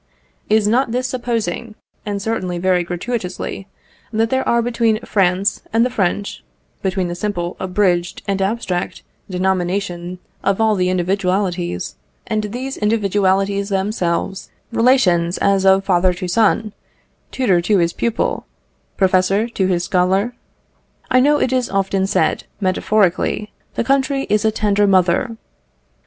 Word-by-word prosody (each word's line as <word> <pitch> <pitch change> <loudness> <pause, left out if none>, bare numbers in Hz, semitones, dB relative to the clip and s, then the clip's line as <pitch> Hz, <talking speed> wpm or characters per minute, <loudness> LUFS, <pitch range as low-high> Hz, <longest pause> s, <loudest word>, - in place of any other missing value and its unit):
Is 215 -1 +3
not 240 +3 +2
this 250 +2 -1
supposing, 235 -4 -3 0.3
and 205 -1 -2
certainly 195 -4 -2
very 180 0 +2
gratuitously, 185 +1 -4 0.4
that 225 0 0
there 265 0 0
are 235 0 +3
between 230 -2 +1
France 190 0 +1
and 230 +2 +3
the 250 - -1
French 200 - -2 0.4
between 190 -1 -1
the 175 - -3
simple, 175 -2 -3
abridged, 180 -2 0
and 195 -1 0
abstract 190 -3 -2 0.3
denomination 180 -1 -1 0.3
of 195 +1 +1
all 220 -1 +3
the 180 -2 +1
individualities, 185 -1 -1 0.3
and 215 -2 -1
these 255 +6 -5
individualities 200 -2 +1
themselves 190 -2 -1 0.2
relations 215 -8 +3
as 195 -1 +2
of 190 0 +5
father 180 -1 +2
to 180 0 -4
son, 215 +2 +2 0.6
tutor 195 -10 +2
to 200 +4 +2
his 170 -1 +1
pupil, 235 -2 -1 0.5
professor 190 +3 +2
to 195 -5 0
his 175 -2 0
scholar? 190 +6 +1 0.8
I 255 - +5
know 290 +3 +4
it 260 - +1
is 255 -2 0
often 195 0 0
said, - - +1
metaphorically, 200 +1 +1 0.2
"the - - 0
country 275 +2 +1
is 210 0 +2
a 220 - +4
tender 205 -1 +2
mother." 190 +5 +2
195 Hz, 135 wpm, -19 LUFS, 185-225 Hz, 0.8 s, of